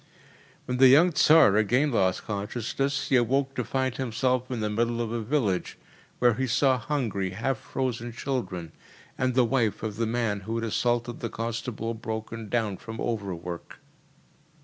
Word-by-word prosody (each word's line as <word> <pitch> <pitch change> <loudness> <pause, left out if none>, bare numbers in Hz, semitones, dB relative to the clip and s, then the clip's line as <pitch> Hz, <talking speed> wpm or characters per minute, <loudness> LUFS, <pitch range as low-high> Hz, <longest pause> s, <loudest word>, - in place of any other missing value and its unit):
When 125 0 -2
the 130 +1 +8
young 155 +8 +6
Tsar 150 -10 +6
again 125 +7 +2
lost 95 -6 +1
consciousness, 120 +6 -2
he 135 - +5
awoke 135 +3 +1
to - - -2
find 130 -2 -1
himself 125 0 0
in 125 -3 -3
the 105 - -1
middle 120 +2 0
of 115 -2 -2
a 120 0 -2
village, 110 -6 -1 0.4
where 120 -1 +4
he 130 +4 -1
saw 130 +1 +3
hungry, 115 -9 -2
half 125 +1 -1
frozen 120 -3 -3
children 100 - -4 0.4
and 130 -1 0
the 130 -2 +5
wife 115 -4 0
of 105 -2 -4
the 115 -1 0
man 115 -3 0
who 110 +4 -5
had 115 - -2
assaulted 120 +1 0
the 115 - -3
constable 115 0 -4
broken 110 0 -6
down 110 -5 0
from 110 +3 -8
overwork. 90 -6 -4
115 Hz, 165 wpm, -27 LUFS, 110-130 Hz, 0.4 s, the